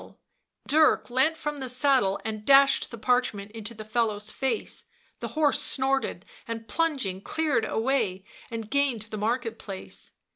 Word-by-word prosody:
One - - -12
seized - - -20
his - - -12
bridle; 310 - +8
Dark - - -3
leant 270 +6 +2
from 295 -2 -3
the 260 -2 -4
saddle 250 -6 +2
and 215 -1 -4
dashed 275 +2 +5
the 235 - -8
parchment 220 -4 0
into 225 +1 -6
the 215 0 -8
fellow's 215 -1 -1
face, 265 -1 -2 0.3
the - - -4
horse 295 -3 +3
snorted, 265 -8 +1 0.2
and 225 -1 -5
plunging 260 - 0
cleared 295 -4 0
a - - -3
way 220 -6 0 0.2
and 225 -2 -5
gained 270 -3 +1
the 215 0 -7
market 230 +1 -1
place. 195 -2 -7
235 Hz, 175 wpm, -27 LUFS, 215-270 Hz, 0.3 s, bridle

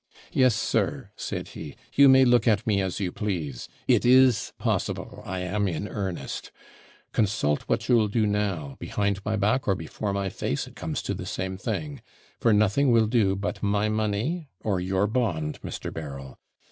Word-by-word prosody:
'Yes, 130 -4 +4
sir,' - - -1
said - - -5
he, - - -8 0.2
'you 140 -1 +7
may 130 0 +7
look 120 -1 +4
at 110 +1 +3
me 105 -4 +2
as 95 0 -2
you 95 -3 -1
please 85 - -4 0.2
it - - +4
is 125 -3 +5
possible - - -2
I 95 0 -3
am 100 +3 0
in 90 +3 -3
earnest. 95 -5 -4 0.6
Consult 95 -9 +1
what - - 0
you'll 115 -4 +4
do 110 +1 +1
now, 100 -9 -1
behind 100 -1 -1
my 110 +1 -1
back 110 +5 +1
or 100 - +3
before 95 +4 -4
my 100 -1 -1
face, 70 -5 -2
it - - -14
comes - - -4
to - - -2
the - - -6
same 95 0 -3
thing; 145 +8 -4 0.4
for 115 - +3
nothing 105 +6 +3
will 115 -1 +5
do 105 -4 +2
but 100 +1 -4
my 105 +1 +1
money 110 - -1
or 100 -4 0
your 95 +2 +1
bond, 100 -10 -1
Mr. - - -5
Berryl. 70 -4 -7
105 Hz, 175 wpm, -26 LUFS, 95-115 Hz, 0.6 s, you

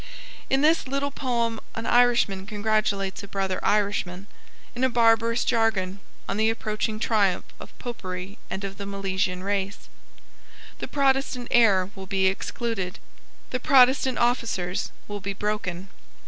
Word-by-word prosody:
In 270 +1 +3
this 315 -1 +3
little 275 +1 -1
poem 235 -4 -1 0.2
an 225 - -4
Irishman 235 -6 +3
congratulates 205 -2 0
a 200 - -9
brother 195 -2 -2
Irishman, 200 -3 0 0.5
in 245 - -3
a 260 - +4
barbarous 230 -1 +3
jargon, 215 -5 +1 0.3
on 195 - -2
the 220 +1 +3
approaching 215 -1 -2
triumph 205 -5 +2
of - - -12
Popery 190 -4 -6
and 195 - -4
of 195 -1 -5
the 200 - -6
Milesian 190 -2 -2
race. 200 0 -2 0.9
The - - -4
Protestant 270 -3 +1
heir 200 -5 +4
will 190 -1 -9
be 190 0 +1
excluded. 195 -1 -2 0.5
The 255 - -1
Protestant 260 -1 +5
officers 230 -7 0 0.2
will 205 -1 -5
be 200 +1 -3
broken. 195 -3 -3
210 Hz, 135 wpm, -25 LUFS, 195-240 Hz, 0.9 s, Protestant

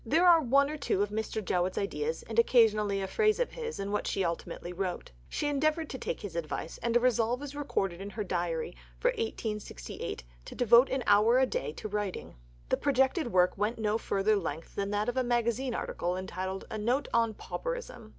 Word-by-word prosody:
There 320 +9 +3
are 335 -2 +7
one 280 +1 +4
or 305 - -4
two 205 -8 +1
of 205 - -4
Mr. 220 -1 -3
Jowett's 180 +1 0
ideas, 445 - -2
and - - -1
occasionally 215 - +4
a - - -2
phrase 430 - +2
of - - 0
his, 465 - -5
in 200 0 -3
what 210 - -1
she 195 - 0
ultimately 170 +1 -4
wrote. 180 -1 -4 0.2
She - - -2
endeavoured 310 +2 0
to 260 - -5
take - - -4
his 200 -6 -7
advice, 165 0 -4
and 235 0 +2
a - - +3
resolve 245 +1 +1
is 290 0 -7
recorded 195 -11 -2
in 200 - -5
her 210 +1 -4
diary 175 -2 -2 0.2
for - - +2
1868 215 - -4 0.2
to - - -9
devote 240 +2 +6
an 265 -1 -1
hour 210 +4 +5
a 260 - +5
day 470 - -3
to - - -6
writing. 205 -2 -4 0.4
The - - +2
projected 265 0 +1
work 180 -1 +4
went 210 +3 +1
to 225 - -7
no 210 +1 +1
further 210 0 +1
length 165 -3 -5
than 200 0 -2
that 205 +1 0
of 245 +1 -2
a 260 - +3
magazine 240 +1 0
article 175 +1 -2
entitled 190 0 -4
"A 220 - -3
Note 245 +6 +1
on 230 -2 +2
Pauperism." - - -5
220 Hz, 210 wpm, -30 LUFS, 195-270 Hz, 0.4 s, are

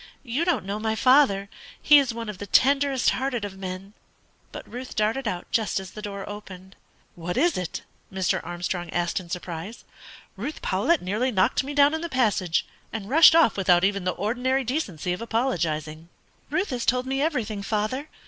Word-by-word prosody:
"You 265 +6 -1
don't 325 - 0
know 200 +2 -3
my 220 0 -1
father; 255 -6 +4 0.3
he 295 -1 +7
is 270 -3 0
one 230 0 -6
of 210 -3 -6
the 205 - -6
tenderest 275 +3 +3
hearted 255 -4 -2
of 195 -2 -7
men." 190 +1 -6 0.6
But - - -9
Ruth 250 +2 -8
darted 225 +4 0
out 180 -3 -3
just 220 -4 +1
as 190 -1 -9
the 215 - -9
door 200 -2 -6
opened. 190 -2 -10 0.4
"What 175 +3 -5
is 340 +6 +3
it?" 180 -2 -4 0.3
Mr. 190 -2 0
Armstrong 175 0 -4
asked 175 +2 -1
in 175 -2 -12
surprise. 180 +4 -6 0.5
"Ruth 245 +11 -5
Powlett 210 - +1
nearly 210 +8 0
knocked 210 +2 +2
me 285 +2 -6
down 285 +1 +5
in 320 - -2
the 340 - -4
passage, 210 - +1 0.3
and 215 -2 -6
rushed 320 +2 +8
off 330 -9 +5
without 180 -2 +4
even 200 -1 +1
the 180 0 0
ordinary 250 +6 0
decency 205 - -2
of 180 - -6
apologising." 165 - -2 0.4
"Ruth 370 -3 -1
has 245 -2 -2
told 250 +1 +1
me 270 +1 -1
everything, 235 -10 -1
father. 215 +8 -2
215 Hz, 185 wpm, -25 LUFS, 185-260 Hz, 0.6 s, rushed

